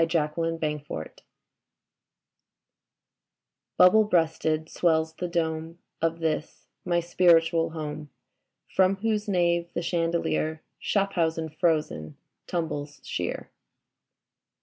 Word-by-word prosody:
3 165 - +4
8 150 0 -3
Leda 165 0 -1 0.2
FRASCATI'S 110 - -8 2.5
BUBBLE 215 +4 +7
BREASTED 160 -4 +1
swells 160 -2 +1
the 180 +2 -4
dome 165 -1 -2 0.2
Of 165 0 +1
this 155 -1 -2 0.2
my 175 -1 +1
spiritual 165 -1 +3
home. 155 -2 -6 0.7
From 190 +1 +4
whose 215 +1 -1
nave 170 -3 +1
the 170 - -1
chandelier. 165 -2 -1 0.2
Schaffhausen 165 -5 0
frozen, 150 - -1 0.3
tumbles 150 -4 -3
sheer. - - -4
165 Hz, 95 wpm, -27 LUFS, 160-175 Hz, 2.5 s, BUBBLE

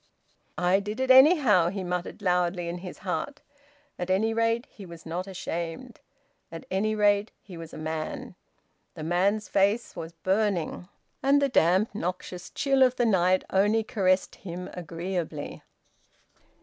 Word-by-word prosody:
"I 180 +2 +3
did 210 +4 -5
it, 260 0 +2
anyhow!" 260 - +6
he 195 +1 -4
muttered 180 +3 -4
loudly, 180 -1 +1
in 175 +1 -4
his 180 0 -8
heart. 280 +10 -3 0.6
At 180 0 -3
any 215 +4 +2
rate 230 +1 +1
he 205 - -12
was 170 -3 -11
not 180 +4 -5
shamed. 165 -2 -5 0.5
At 165 - -8
any 215 +3 0
rate 205 0 +3
he 185 - -11
was 165 -1 -9
a - - -9
man. 155 0 -5 0.6
The 155 - -7
man's 195 +6 +1
face 200 +4 +1
was 165 +1 -7
burning, 185 -1 -1 0.3
and 280 +1 +4
the 280 -1 +1
damp 190 -1 +3
noxious 180 -1 -5
chill 270 -1 +1
of 255 -1 +5
the 240 - +1
night 185 -3 +3
only 210 +3 +3
caressed 195 -5 0
him 180 0 -7
agreeably. 170 -2 -5
190 Hz, 150 wpm, -27 LUFS, 175-215 Hz, 0.6 s, anyhow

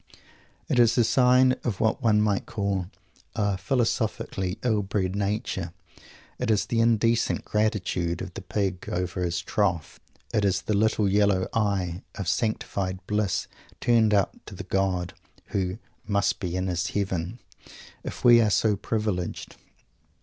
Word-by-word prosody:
It 125 - +1
is 115 0 +5
a 120 - +5
sign 125 +2 +5
of 110 -6 -2
what 110 +4 +1
one 105 -3 +3
might 105 -2 0
call 100 -3 -2 0.5
a 100 -3 +1
philosophically 105 -3 -1
ill 110 -4 +2
bred 95 -1 -2
nature. 100 -4 -2 0.7
It 125 - -1
is 105 -2 +2
the 115 - -1
indecent 115 0 +2
"gratitude" 95 -5 0
of 95 -2 -6
the - - -7
pig 95 -1 -2
over 90 0 -2
his 85 -1 0
trough. 90 -6 -1 0.3
It 105 - +2
is 95 -1 +1
the 105 - -1
little 105 0 +2
yellow 100 -1 +2
eye 100 -5 0
of 100 - -5
sanctified 95 -2 -1
bliss 105 -2 0 0.3
turned 115 -3 +3
up 100 -2 +1
to - - -9
the - - -6
God 95 -2 -1 0.4
who 95 0 -1 0.3
"must 100 -1 +1
be 90 -4 -3
in 95 0 -1
His 90 0 -1
Heaven" 95 0 -2 0.7
if - - -7
we 120 -1 +8
are 110 - +3
so 105 +1 +2
privileged. 105 -3 -3
100 Hz, 150 wpm, -26 LUFS, 95-110 Hz, 0.7 s, we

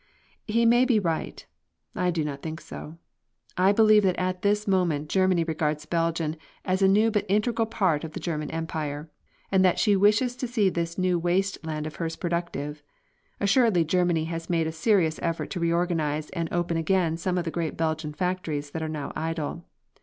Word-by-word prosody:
He 230 +2 +2
may 240 +2 +5
be 250 -4 +3
right; 165 -5 -3 0.5
I 180 - 0
do 165 -3 -1
not 140 -2 -5
think 160 0 -5
so. 160 0 -9 0.6
I 185 +2 +4
believe 215 0 +6
that 185 -3 +2
at 185 0 -2
this 210 +1 +1
moment 170 -6 +1
Germany 185 -2 +3
regards 155 -2 -2
Belgium 165 -1 -1 0.3
as 185 +1 0
a 195 - +6
new 210 +4 +4
but 210 -2 +1
integral 225 +3 +1
part 185 -9 +1
of 160 -1 -6
the - - -5
German 155 -3 -3
Empire, 155 -2 -4 0.4
and 190 -1 +4
that 180 -2 +3
she 210 -2 +3
wishes 210 +5 +3
to 255 - -3
see 220 -5 +2
this 170 -1 -3
new 185 -2 +1
waste 185 +3 0
land 155 -1 -4
of 155 - -7
hers 165 -1 -3
productive. 170 -4 -3 0.6
Assuredly 200 -4 +3
Germany 175 -1 +1
has 165 0 -5
made 165 -2 +1
a 160 - -2
serious 165 -1 +2
effort 165 -1 -2
to - - -3
reorganise 165 -3 0
and 165 -1 -3
open 175 -1 0
again 165 0 +1
some 180 +2 -2
of 175 - -1
the 165 - -2
great 165 -2 -3
Belgian 160 -1 -1
factories 155 -4 -3
that 160 - -4
are 160 - -3
now 150 -2 -5
idle. 165 +1 -3
170 Hz, 190 wpm, -26 LUFS, 160-190 Hz, 0.6 s, believe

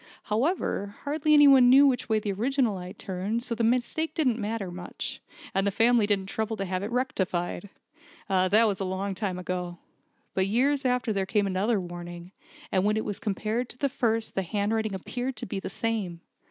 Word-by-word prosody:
However, 215 - -1
hardly 305 +1 +2
any 290 -1 +8
one 260 -3 +7
knew 275 +3 +8
which 255 -4 +1
way 220 - +3
the 210 -1 -2
original 240 +2 +1
eye 180 0 -7
turned, 200 +4 -3
so 245 - -2
the 230 0 -1
mistake 250 +7 0
didn't 255 -8 +1
matter 210 -3 -3
much, 175 0 -6 0.3
and 195 +1 +1
the - - +4
family 225 +1 +3
didn't 200 -2 +1
trouble 220 +3 -3
to 195 - -2
have 185 0 -2
it 205 - -3
rectified. 195 -7 -2 0.6
That 195 +3 +4
was 200 -3 -1
a - - -1
long 190 +1 -2
time 190 -1 -3
ago. 180 -1 -4 0.6
But 190 0 +1
years 270 +6 +1
after 250 -3 +1
there 195 -1 -1
came 205 0 +2
another 200 +3 +1
warning; 175 0 -8 0.4
and 185 - +2
when 210 +1 +2
it 220 - -2
was 205 -2 -3
compared 220 +4 -2
with 250 - -27
the 280 - +1
first 225 -3 0
the 195 - 0
handwriting 210 +2 -1
appeared 245 +7 -4
to 220 - -3
be 195 - -4
the - - -5
same. 205 -7 -3
210 Hz, 195 wpm, -27 LUFS, 190-245 Hz, 0.6 s, any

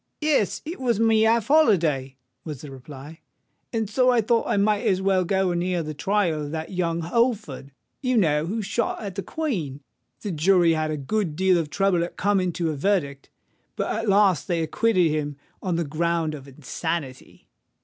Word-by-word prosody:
"Yes: 300 -9 +1
it 330 +4 -6
was 240 -5 0
my 225 0 +4
half 220 0 +3
holiday," 165 - +3 0.3
was 150 -5 -7
the 145 - -9
reply; 140 +4 -11 0.5
"and 225 -2 -1
so 250 +5 +2
I 245 -1 +4
thought 230 +1 +1
I - - +1
might 205 +1 +2
as 185 - +2
well 190 -1 +2
go 190 +1 +1
and 175 0 -1
hear 180 -1 -1
the 155 0 -5
trial 175 0 0
of - - -6
that 160 +3 -5
young 170 -2 -1
Holford, 215 - -1 0.3
you 255 -2 +1
know, 155 -5 +2
who 215 +4 -2
shot 220 +3 -2
at 200 -2 -5
the 195 - -4
Queen. 190 - -3 0.4
The 205 - -4
jury 175 +1 +4
had 155 -1 -1
a 155 - -2
good 165 +3 -2
deal 185 0 +3
of 155 -3 -3
trouble 195 -1 +1
at 170 - -7
coming 190 -2 +1
to 165 -2 -1
a - - -4
verdict; 140 -5 -1 0.5
but - - -2
at 220 -1 -2
last 195 -7 +3
they 170 -2 0
acquitted 180 0 +2
him 145 -2 -2 0.2
on 180 -3 -1
the 170 - 0
ground 165 +1 -1
of 140 -2 -9
insanity." 140 0 -5
180 Hz, 190 wpm, -24 LUFS, 155-210 Hz, 0.5 s, my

